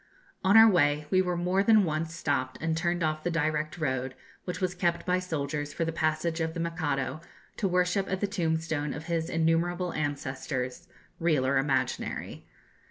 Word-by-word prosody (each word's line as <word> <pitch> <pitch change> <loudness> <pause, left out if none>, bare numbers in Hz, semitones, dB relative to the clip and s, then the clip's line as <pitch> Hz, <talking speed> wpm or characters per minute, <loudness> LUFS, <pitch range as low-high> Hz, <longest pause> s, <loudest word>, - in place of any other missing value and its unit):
On 195 +3 +6
our 225 0 +10
way 150 -6 +3
we 185 - +5
were 180 -1 -1
more 180 +3 +1
than 215 0 +5
once 160 0 -2
stopped 130 -6 -1
and 160 0 -1
turned 170 +1 0
off 155 0 -1
the 175 - 0
direct 155 -1 -1
road, 130 -4 -2 0.3
which 180 0 -4
was 185 -2 0
kept 175 -1 0
by 180 0 +2
soldiers 145 -4 -3
for 165 - -1
the 165 - -1
passage 160 +1 0
of 160 +1 -2
the - - -3
Mikado 155 -4 -2 0.4
to 200 - +1
worship 180 +2 +1
at 190 0 -1
the 205 - +1
tombstone 160 -6 -1
of 150 - -6
his 165 -1 -1
innumerable 170 +2 +1
ancestors, 135 0 -3 0.3
real 155 -6 +2
or 135 +1 +3
imaginary. 135 -1 -2
165 Hz, 175 wpm, -28 LUFS, 150-180 Hz, 0.4 s, our